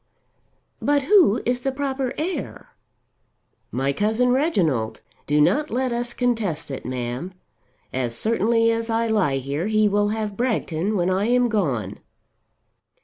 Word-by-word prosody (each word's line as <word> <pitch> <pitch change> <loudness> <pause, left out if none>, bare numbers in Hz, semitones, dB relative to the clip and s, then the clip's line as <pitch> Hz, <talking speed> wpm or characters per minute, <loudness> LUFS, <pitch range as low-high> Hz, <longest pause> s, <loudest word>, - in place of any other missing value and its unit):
"But 285 -1 +2
who 345 - +4
is 245 +1 +1
the 270 +2 -1
proper 265 -2 -2
heir?" 355 +4 -4 1.0
"My 135 +2 0
cousin 220 - +1
Reginald. 175 - +1 0.3
Do 150 +1 +2
not 295 - +3
let 255 +2 -1
us 240 0 -3
contest 220 - -1
it, 135 - -6
ma'am. 125 +8 -4 0.6
As 120 -3 -1
certainly 230 +1 +2
as 230 0 -2
I 225 +1 +1
lie 210 -12 +1
here 140 +7 -3
he 215 -1 +3
will 205 0 +2
have 215 -1 -3
Bragton 210 -5 -1
when 180 -1 +1
I 190 +2 +1
am 245 0 +3
gone." 130 - -1
215 Hz, 140 wpm, -23 LUFS, 155-245 Hz, 1.0 s, who